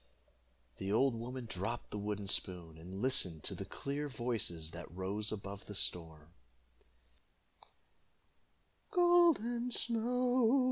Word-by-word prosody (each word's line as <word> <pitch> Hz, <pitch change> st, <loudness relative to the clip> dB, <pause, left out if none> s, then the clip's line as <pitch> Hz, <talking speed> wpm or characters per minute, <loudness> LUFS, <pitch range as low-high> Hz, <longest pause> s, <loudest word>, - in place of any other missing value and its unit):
The 95 Hz, 0 st, -2 dB
old 130 Hz, +4 st, +4 dB
woman 120 Hz, +2 st, -5 dB
dropped 110 Hz, +3 st, -4 dB
the 105 Hz, -, -3 dB
wooden 105 Hz, -1 st, -3 dB
spoon, 90 Hz, -4 st, +1 dB
and 95 Hz, +6 st, -7 dB
listened 90 Hz, -, +2 dB
to -, -, -2 dB
the -, -, -6 dB
clear 145 Hz, +1 st, -4 dB
voices 110 Hz, -, -1 dB
that 85 Hz, 0 st, -8 dB
rose 95 Hz, +4 st, -2 dB
above 100 Hz, -1 st, -6 dB
the 105 Hz, -, -6 dB
storm: 80 Hz, -3 st, 0 dB, 2.6 s
"Golden 335 Hz, -, +4 dB
Snow! 245 Hz, +2 st, +2 dB
110 Hz, 110 wpm, -35 LUFS, -, 2.6 s, old